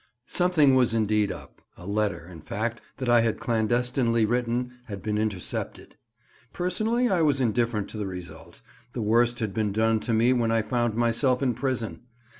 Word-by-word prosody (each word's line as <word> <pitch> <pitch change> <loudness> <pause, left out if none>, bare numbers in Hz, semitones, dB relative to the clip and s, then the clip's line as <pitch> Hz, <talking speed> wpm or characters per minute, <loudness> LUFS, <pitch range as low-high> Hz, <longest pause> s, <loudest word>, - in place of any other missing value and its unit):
SOMETHING 175 -6 +3
was 125 -3 +3
indeed 105 -2 +1
up; - - -11 0.2
a 90 - -12
letter, 100 -4 -1
in 85 -2 -11
fact, 110 +8 -3 0.2
that 130 -1 -4
I 120 -1 +5
had 115 -1 0
clandestinely 120 -2 +1
written 120 +2 -1
had 100 -5 -8
been 105 -1 -1
intercepted. 105 -4 -3 0.6
Personally 215 +7 0
I 185 -6 +2
was 145 -3 +2
indifferent 115 -3 0
to - - -7
the 105 - -2
result; 90 -4 -9 0.3
the 120 - -3
worst 120 +3 +3
had 105 -3 -2
been 105 -1 0
done 110 +2 +2
to 115 - -3
me 115 +3 +4
when 120 -2 +1
I 115 -1 +2
found 120 -2 -1
myself 120 +3 +2
in 125 -2 +2
prison. 115 -7 -3
115 Hz, 175 wpm, -26 LUFS, 105-125 Hz, 0.6 s, I